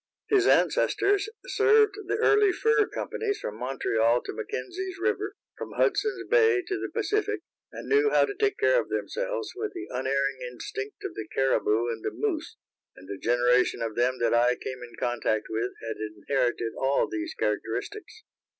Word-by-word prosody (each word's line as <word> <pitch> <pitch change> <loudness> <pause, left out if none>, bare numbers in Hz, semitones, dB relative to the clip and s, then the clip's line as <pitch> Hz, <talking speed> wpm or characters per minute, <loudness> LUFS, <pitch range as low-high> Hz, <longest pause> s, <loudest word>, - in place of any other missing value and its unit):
His 395 -2 +4
ancestors 405 +1 +3 0.2
served 430 -3 +4
the - - 0
early 415 -2 +4
fur 425 +2 +2
companies 420 -2 -3
from 105 +1 -6
Montreal 120 -2 +1
to - - -5
McKenzie's 380 -3 -5
river, 415 0 -1 0.2
from - - -6
Hudson's 405 -2 +1
bay 450 -5 +4
to 380 +2 -3
the - - -4
Pacific, 425 -2 -1 0.3
and - - -8
knew 425 0 +4
how - - +4
to 410 - -5
take 415 -1 0
care - - +4
of - - -11
themselves - - -3
with 420 +1 -4
the 355 - -6
unerring 135 +1 0
instinct 125 +2 -6
of - - -4
the 110 -1 -6
cariboo 120 -4 +2
and 115 -1 -5
the - - 0
moose, 380 -8 -3 0.4
and 95 - -14
the 100 0 -6
generation 120 0 +2
of 115 -1 -3
them 125 +2 +1
that 120 -1 +1
I 120 +1 +4
came 130 0 -7
in 120 -1 -10
contact 115 -3 0
with 115 +3 -1
had 115 0 -4
inherited 115 +2 -1
all 135 +1 +2
these 330 -2 -4
characteristics. 425 +1 -3
350 Hz, 170 wpm, -27 LUFS, -, 0.4 s, His